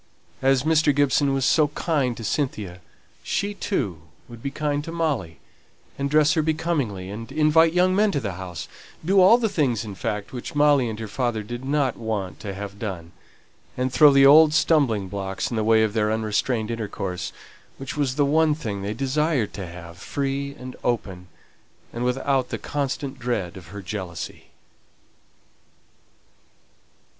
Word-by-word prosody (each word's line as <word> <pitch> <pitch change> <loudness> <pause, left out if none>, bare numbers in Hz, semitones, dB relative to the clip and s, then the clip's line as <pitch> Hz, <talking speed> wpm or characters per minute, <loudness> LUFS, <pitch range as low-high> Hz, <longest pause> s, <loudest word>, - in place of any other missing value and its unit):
As 135 -1 +3
Mr. 155 -2 +3
Gibson 145 0 +3
was 135 -2 0
so 155 -2 +4
kind 145 -5 -1
to 115 - -7
Cynthia, 105 -8 -2 0.4
she 205 +1 -2
too 110 - -2 0.3
would 120 -2 -12
be 140 - -3
kind 145 +1 -2
to 165 - -7
Molly, 145 - -2 0.6
and 140 0 -2
dress 150 +1 +4
her 160 - +2
becomingly, 150 - -1
and 115 +2 -7
invite 160 +1 +4
young 180 +1 +3
men 210 +1 +3
to 145 - +1
the 105 -7 -3
house; 90 -2 -7 0.4
do 190 +2 +4
all 195 +6 +7
the 235 -2 0
things, 130 - 0
in 105 - -6
fact, 105 +3 -4
which 125 +3 -6
Molly 145 -4 +4
and 110 - -5
her 110 - -5
father 115 -1 -2
did 120 +4 -7
not 140 -1 0
want 105 -5 -4
to 100 -2 -6
have 100 0 -7
done, 90 -6 -5 0.7
and 125 0 -1
throw 150 -1 +7
the 135 0 +6
old 150 +2 +7
stumbling 140 - +2
blocks 95 +2 -4
in - - -2
the 110 - 0
way 110 0 +4
of 110 -2 0
their 105 -1 +1
unrestrained 110 +1 -1
intercourse, 100 -5 -4 0.5
which 135 -1 -6
was 140 -3 0
the 145 -1 +3
one 155 +1 +3
thing 105 -10 -5
they 100 +2 -3
desired 135 -1 0
to 95 -3 -6
have, 85 0 -11
free 140 +4 -3
and 130 0 -8
open, 95 -7 -2 0.7
and 120 - -3
without 130 +1 0
the - - -3
constant 140 -1 -3
dread 105 -7 -2
of 95 -2 -11
her 100 -1 -9
jealousy. 90 -3 -6
125 Hz, 170 wpm, -24 LUFS, 105-150 Hz, 0.7 s, all